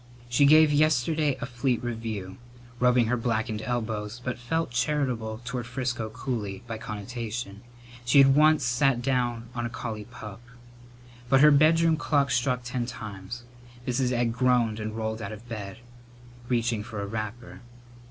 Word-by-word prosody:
She 130 +4 +4
gave 155 +1 +7
yesterday 150 -1 +2
a - - -1
fleet 125 0 -1
review, 110 -5 -4 0.4
rubbing 125 -1 +4
her 120 +3 +1
blackened 115 -2 -1
elbows, 110 -2 -3
but 125 -1 -3
felt 160 +4 -1
charitable 125 -4 -1
toward 120 -1 -4
Frisco 120 -3 -3
Cooley 110 -5 -4
by 115 -2 -6
connotation; 110 -1 -5 0.4
she 120 +3 +3
had 135 -1 +8
once 155 -1 +5
sat 125 0 +2
down 120 -3 0
on 120 -1 -2
a - - -7
collie 110 -3 -5
pup. 105 -2 -10 0.9
But 135 +1 +5
her 150 +1 +8
bedroom 160 +2 +4
clock 145 -2 +1
struck 125 0 +1
ten 120 0 -3
times. 110 -1 -7 0.4
Mrs. 125 0 0
Egg 120 -2 +1
groaned 120 -3 +2
and 110 +1 -4
rolled 110 0 -3
out 110 - -5
of 110 +3 -10
bed, 110 -3 -6 0.7
reaching 115 -3 +1
for 105 0 -7
a 100 - -2
wrapper. 110 +4 -6
120 Hz, 150 wpm, -27 LUFS, 110-130 Hz, 0.9 s, had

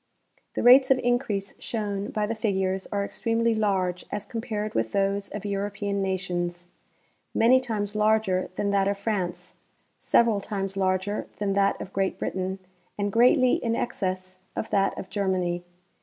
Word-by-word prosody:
The - - -1
rates 260 +2 +8
of 265 - +5
increase 245 -6 -1
shown 205 -3 -3
by 210 -1 -1
the 220 - -2
figures 190 -4 -1
are 200 -1 0
extremely 230 +2 0
large 190 -4 0
as 205 -1 -3
compared 215 -2 -4
with 115 0 -1
those 200 0 0
of 205 0 -6
European 200 0 -2
nations; 175 -2 -2 0.7
many 250 +3 +6
times 215 -5 -3
larger 215 -3 +2
than 200 +1 0
that 195 -1 +2
of 200 0 0
France, 185 -4 -3 0.5
several 230 -4 +3
times 195 -2 -3
larger 190 +1 0
than 200 -1 0
that 200 0 +2
of 190 - -8
Great 195 0 0
Britain, 190 0 -2 0.4
and 205 0 -1
greatly 250 +2 +4
in 230 -1 +1
excess 185 -4 -3 0.2
of 220 - -4
that 195 -1 +2
of - - -7
Germany. 185 -3 0
200 Hz, 155 wpm, -26 LUFS, 190-220 Hz, 0.7 s, rates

